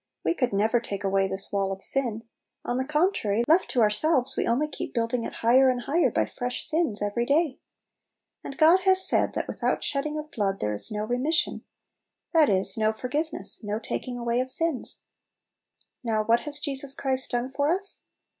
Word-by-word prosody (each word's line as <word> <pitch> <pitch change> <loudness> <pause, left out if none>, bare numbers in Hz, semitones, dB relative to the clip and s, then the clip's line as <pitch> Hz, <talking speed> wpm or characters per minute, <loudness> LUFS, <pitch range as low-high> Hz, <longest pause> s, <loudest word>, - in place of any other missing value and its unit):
We - - +2
could 255 -7 -1
never 215 +4 +2
take 205 -3 -6
away 195 0 +1
this 190 +1 -1
wall 195 -1 0
of 195 0 -6
sin; 235 -5 +1 0.4
on 245 - -1
the 260 - -1
contrary, 300 - +1
left 335 +4 +3
to 245 - +1
ourselves, 260 +5 +2
we - - -1
only 260 +6 +1
keep 300 - -7
building 230 0 -1
it - - -5
higher 260 +3 +5
and 250 -1 -1
higher 325 +7 +1
by - - 0
fresh 245 0 -4
sins 305 -11 0
every 205 +3 -1
day. 285 +2 +1 0.8
And 275 - -8
God 330 +4 +6
has 375 0 +4
said, - - +2
that - - -2
"without - - -2
shedding 295 +2 -2
of 305 +1 -7
blood 195 -5 -1
there 105 - -1
is 105 - -1
no 210 0 -3
remission," 285 +9 -1 0.7
that 315 -4 +5
is, 190 0 +2
no 215 0 +2
for 220 - -12
26 - - -19
Little 250 - -2
Pillows. 300 +5 0 0.3
giveness, - - -20
no 210 +1 -3
taking 245 +2 -5
away 235 0 -1
of 255 +1 -2
sins. 325 0 -2 1.0
Now 220 -2 0
what 230 +2 +3
has 290 - +2
Jesus 275 -2 0
Christ 265 -2 -1
done 245 +2 -2
for 285 +2 0
us? 390 +2 -3
250 Hz, 200 wpm, -26 LUFS, 215-300 Hz, 1.0 s, God